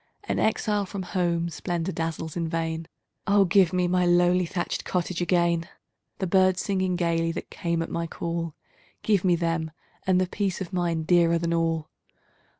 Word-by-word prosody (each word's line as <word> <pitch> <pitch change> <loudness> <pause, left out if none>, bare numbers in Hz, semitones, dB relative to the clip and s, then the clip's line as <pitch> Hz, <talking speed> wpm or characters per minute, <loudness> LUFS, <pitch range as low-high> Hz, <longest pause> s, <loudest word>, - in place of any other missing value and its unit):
An - - -2
exile 210 -2 +1
from 195 0 -5
home, 175 -2 0
splendor 175 +2 -3
dazzles 165 -2 -4
in 170 -2 -1
vain! 165 -1 -2 0.4
Oh, 200 0 +5
give 180 0 +4
me 180 -1 +1
my 180 0 +2
lowly 175 0 +3
thatched 175 +1 -3
cottage 180 -1 -2
again! 170 0 +1 0.5
The 190 - -2
birds 185 0 +3
singing 185 -2 0
gaily 165 -1 +1
that - - -7
came 170 -1 -1
at - - -8
my 170 0 -2
call! 165 -1 -4 0.5
Give 205 -4 +2
me 180 -2 +4
them! 165 -1 -1 0.4
and 185 -1 +4
the 185 - +2
peace 190 0 -2
of 190 0 -6
mind, 170 -3 0
dearer 170 -1 +4
than 170 0 -1
all. 165 -2 0
175 Hz, 170 wpm, -26 LUFS, 165-185 Hz, 0.5 s, Oh